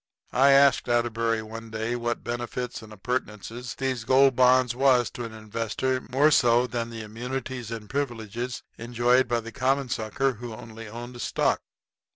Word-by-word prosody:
I 135 Hz, +3 st, +5 dB
asked 140 Hz, -2 st, +5 dB
Atterbury 115 Hz, -1 st, +1 dB
one 115 Hz, +1 st, -8 dB
day 110 Hz, +2 st, -2 dB
what 120 Hz, 0 st, -2 dB
benefits 120 Hz, +1 st, -4 dB
and 110 Hz, -1 st, -12 dB
appurtenances 120 Hz, +2 st, -4 dB
these 130 Hz, -3 st, -2 dB
Gold 130 Hz, +2 st, +5 dB
Bonds 125 Hz, -1 st, +4 dB
was 125 Hz, -2 st, +3 dB
to 120 Hz, -, -5 dB
an 115 Hz, -, -7 dB
investor 115 Hz, +4 st, -2 dB
more 140 Hz, +4 st, +4 dB
so 120 Hz, -2 st, +4 dB
than 120 Hz, -2 st, -3 dB
the 115 Hz, -1 st, -7 dB
immunities 125 Hz, +2 st, -5 dB
and 115 Hz, -2 st, -6 dB
privileges 120 Hz, -2 st, -3 dB, 0.2 s
enjoyed 120 Hz, +2 st, +2 dB
by 120 Hz, -1 st, 0 dB
the 115 Hz, +1 st, -8 dB
common 135 Hz, +2 st, 0 dB
sucker 130 Hz, +3 st, 0 dB
who 120 Hz, 0 st, -8 dB
only 115 Hz, 0 st, -10 dB
owned 120 Hz, +2 st, -8 dB
stock. -, -, +1 dB
120 Hz, 160 wpm, -26 LUFS, 115-130 Hz, 0.2 s, I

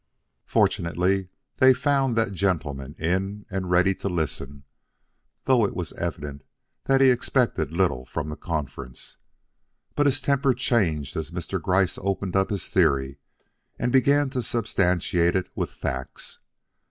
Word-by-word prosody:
Fortunately, 90 Hz, +2 st, +1 dB, 0.3 s
they 130 Hz, -1 st, +6 dB
found 135 Hz, -3 st, +1 dB
that 115 Hz, -3 st, +1 dB
gentleman 75 Hz, -7 st, -2 dB
in 95 Hz, +5 st, -2 dB
and 95 Hz, -1 st, -3 dB
ready 90 Hz, +2 st, +4 dB
to 100 Hz, -, -4 dB
listen, 70 Hz, -5 st, -3 dB, 0.8 s
though 130 Hz, -3 st, +4 dB
it 100 Hz, -, -1 dB
was 90 Hz, -4 st, -4 dB
evident 70 Hz, -1 st, -5 dB, 0.4 s
he 135 Hz, -1 st, +5 dB
expected 120 Hz, -, 0 dB
little 85 Hz, -7 st, +1 dB
from 75 Hz, +4 st, -4 dB
the 75 Hz, -, -5 dB
conference. 75 Hz, -7 st, -5 dB, 0.8 s
But 145 Hz, 0 st, +2 dB
his 135 Hz, -, +2 dB
temper 140 Hz, -2 st, +2 dB
changed 85 Hz, -, 0 dB
as 80 Hz, -2 st, -3 dB
Mr. 90 Hz, +1 st, -4 dB
Gryce 95 Hz, +2 st, +1 dB
opened 95 Hz, -1 st, -2 dB
up 95 Hz, 0 st, +2 dB
his 100 Hz, -3 st, -4 dB
theory 70 Hz, 0 st, +2 dB, 0.6 s
and 125 Hz, -, -1 dB
began 140 Hz, +2 st, +3 dB
to 130 Hz, -2 st, -1 dB
substantiate 90 Hz, -7 st, +1 dB
it 95 Hz, -1 st, -1 dB
with -, -, -2 dB
facts. 65 Hz, 0 st, -5 dB
95 Hz, 135 wpm, -25 LUFS, 80-115 Hz, 0.8 s, they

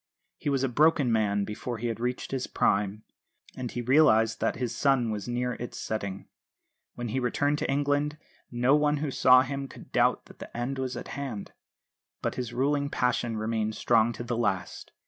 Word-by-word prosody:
He -, -, -2 dB
was 135 Hz, -2 st, +1 dB
a -, -, +3 dB
broken 145 Hz, 0 st, +3 dB
man 105 Hz, -2 st, +2 dB
before 115 Hz, +4 st, -5 dB
he 115 Hz, -, -5 dB
had 115 Hz, -1 st, -2 dB
reached 125 Hz, +1 st, -3 dB
his 135 Hz, -2 st, -2 dB
prime, 105 Hz, +1 st, 0 dB, 0.5 s
and 125 Hz, -2 st, -4 dB
he 120 Hz, -, -4 dB
realised 115 Hz, -5 st, +4 dB
that -, -, 0 dB
his 120 Hz, 0 st, -3 dB
sun 130 Hz, -4 st, +2 dB
was 105 Hz, 0 st, -4 dB
near 125 Hz, +1 st, -1 dB
its 120 Hz, +1 st, -7 dB
setting. 100 Hz, -3 st, -4 dB, 0.7 s
When 120 Hz, -1 st, -4 dB
he 130 Hz, -, -1 dB
returned 145 Hz, +4 st, 0 dB
to -, -, -2 dB
England 145 Hz, +2 st, +1 dB, 0.3 s
no 125 Hz, +3 st, +3 dB
one 150 Hz, 0 st, +2 dB
who 145 Hz, -1 st, -2 dB
saw 130 Hz, 0 st, +6 dB
him 140 Hz, +1 st, -4 dB
could -, -, -13 dB
doubt -, -, +2 dB
that -, -, -16 dB
the -, -, -9 dB
end 130 Hz, +3 st, -2 dB
was 130 Hz, -1 st, -3 dB
at -, -, -7 dB
hand. 135 Hz, -8 st, -5 dB, 0.7 s
But -, -, 0 dB
his 125 Hz, -2 st, -4 dB
ruling 140 Hz, +3 st, 0 dB
passion 120 Hz, -3 st, 0 dB
remained 110 Hz, 0 st, -1 dB
strong 115 Hz, 0 st, +3 dB
to 120 Hz, -, -6 dB
the 120 Hz, 0 st, -2 dB
last. 100 Hz, -6 st, -2 dB
125 Hz, 190 wpm, -28 LUFS, 115-135 Hz, 0.7 s, saw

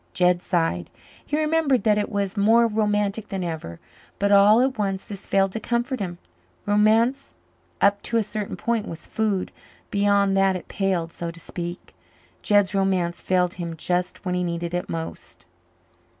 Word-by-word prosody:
Jed 180 Hz, -1 st, +3 dB
sighed. 165 Hz, -, -1 dB, 0.3 s
He 295 Hz, -, -2 dB
remembered 305 Hz, -4 st, +2 dB
that 210 Hz, -2 st, +3 dB
it 205 Hz, -, -2 dB
was 200 Hz, -1 st, -1 dB
more 225 Hz, +3 st, +4 dB
romantic 210 Hz, -1 st, 0 dB
than 190 Hz, -2 st, -3 dB
ever, 160 Hz, -, -5 dB, 0.4 s
but 200 Hz, 0 st, +1 dB
all 205 Hz, +2 st, +7 dB
at 260 Hz, +1 st, +1 dB
once 195 Hz, -3 st, -2 dB
this 200 Hz, -1 st, -8 dB
failed 195 Hz, -1 st, +2 dB
to 225 Hz, -, -4 dB
comfort 240 Hz, +3 st, -1 dB
him. 175 Hz, -3 st, -4 dB, 0.5 s
Romance 220 Hz, +5 st, +2 dB, 0.5 s
up 200 Hz, 0 st, +4 dB
to 230 Hz, -, -1 dB
a 225 Hz, -, +2 dB
certain 210 Hz, 0 st, -4 dB
point 225 Hz, +4 st, -1 dB
was 165 Hz, -, -8 dB
food; 210 Hz, -4 st, -1 dB, 0.4 s
beyond 200 Hz, -1 st, +3 dB
that 195 Hz, -1 st, +3 dB
it 180 Hz, -, -7 dB
palled, 180 Hz, -4 st, -1 dB
so 170 Hz, -, -5 dB
to 170 Hz, 0 st, -10 dB
speak. 175 Hz, +1 st, -7 dB, 0.5 s
Jed's 205 Hz, -1 st, +3 dB
romance 185 Hz, -3 st, 0 dB
failed 180 Hz, -1 st, +1 dB
him 170 Hz, -1 st, -4 dB
just 180 Hz, +4 st, -2 dB
when 180 Hz, -, -1 dB
he 180 Hz, 0 st, 0 dB
needed 170 Hz, 0 st, -3 dB
it 175 Hz, -, -2 dB
most. 165 Hz, 0 st, -7 dB
200 Hz, 165 wpm, -24 LUFS, 180-215 Hz, 0.5 s, all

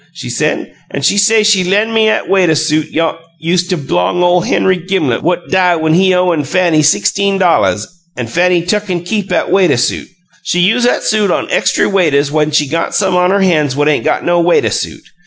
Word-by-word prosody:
she -, -, -7 dB
say, -, -, -2 dB, 0.2 s
an' 140 Hz, -, -5 dB
she 145 Hz, -, +2 dB
say 215 Hz, +2 st, +3 dB
she 210 Hz, -3 st, +3 dB
len' 205 Hz, +5 st, 0 dB
me 220 Hz, -1 st, +3 dB
'at 220 Hz, -, -1 dB
waituh 180 Hz, -5 st, +2 dB
suit 155 Hz, 0 st, -1 dB
yoosta 165 Hz, +2 st, -2 dB
b'long 140 Hz, -, -1 dB
ole 175 Hz, 0 st, +2 dB
Henry 185 Hz, +1 st, 0 dB
Gimlet 175 Hz, -9 st, -2 dB
what 175 Hz, 0 st, -2 dB
die' 180 Hz, -2 st, +2 dB
when 160 Hz, -1 st, 0 dB
he 185 Hz, +2 st, +3 dB
owin' 180 Hz, -4 st, +1 dB
Fanny 165 Hz, +1 st, +1 dB
sixteen 195 Hz, +6 st, +1 dB
dolluhs 180 Hz, -3 st, +1 dB, 0.3 s
an' 125 Hz, -, -3 dB
Fanny 175 Hz, +7 st, 0 dB
tuck 210 Hz, +3 st, -2 dB
an' 175 Hz, -2 st, -3 dB
keep 200 Hz, +2 st, -3 dB
'at -, -, -1 dB
waituh 180 Hz, -9 st, +2 dB
suit. 120 Hz, -, -2 dB, 0.3 s
She 175 Hz, -, -1 dB
use 225 Hz, +7 st, +2 dB
'at -, -, 0 dB
suit 215 Hz, -2 st, 0 dB
on -, -, -2 dB
extry -, -, +1 dB
waituhs 150 Hz, -7 st, +1 dB
when 155 Hz, 0 st, 0 dB
she 150 Hz, -1 st, +1 dB
got 165 Hz, +4 st, -3 dB
some 190 Hz, -2 st, 0 dB
on 180 Hz, 0 st, +2 dB
her 200 Hz, +1 st, +1 dB
hands 155 Hz, -8 st, +1 dB
what 145 Hz, +1 st, 0 dB
'ain't 150 Hz, -, +1 dB
got -, -, -1 dB
no 175 Hz, 0 st, +2 dB
waituh 175 Hz, 0 st, +1 dB
suit. -, -, -5 dB
175 Hz, 205 wpm, -13 LUFS, 155-190 Hz, 0.3 s, say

